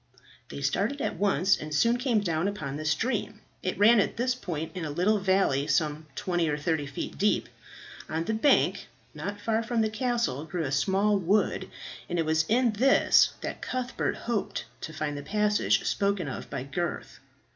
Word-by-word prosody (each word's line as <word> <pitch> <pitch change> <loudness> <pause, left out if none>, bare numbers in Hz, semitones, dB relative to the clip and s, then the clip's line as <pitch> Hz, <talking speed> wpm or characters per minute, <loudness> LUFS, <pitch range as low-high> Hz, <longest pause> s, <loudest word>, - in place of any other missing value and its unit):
They - - -7
started 200 - 0
at - - -2
once 195 -1 +3
and 155 0 -5
soon 235 +9 +3
came 245 -4 +1
down 170 -2 0
upon 155 -10 -4
the 155 +1 -5
stream. 215 +6 -1 0.2
It 185 - -2
ran 215 +3 +6
at 200 - 0
this 250 +2 +1
point 165 -9 -5
in 180 - -4
a 155 - -3
little 185 +8 +2
valley, 190 -8 +2
some 150 +1 0
twenty 175 -3 0
or 145 - 0
thirty 150 -1 -1
feet 140 - -6
deep. 210 +1 +2 0.6
On 160 +1 -1
the 220 - -2
bank 225 +7 +2 0.3
not 205 0 -5
far 220 +2 0
from 230 0 0
the 220 -1 0
castle 230 - -1
grew 165 +1 -3
a 135 - -3
small 195 +8 +2
wood, 195 +4 +1 0.4
and 175 - -1
it 165 - +1
was 160 0 +2
in 240 +1 +3
this 255 +6 +4
that - - -5
Cuthbert 255 0 -2
hoped 235 -4 -3 0.2
to 160 - -6
find 155 -2 -3
the 145 - -5
passage 210 +6 +1
spoken 200 -4 0
of 130 - -6
by 135 -2 -4
Gurth. 155 +5 -4
190 Hz, 185 wpm, -28 LUFS, 155-215 Hz, 0.6 s, ran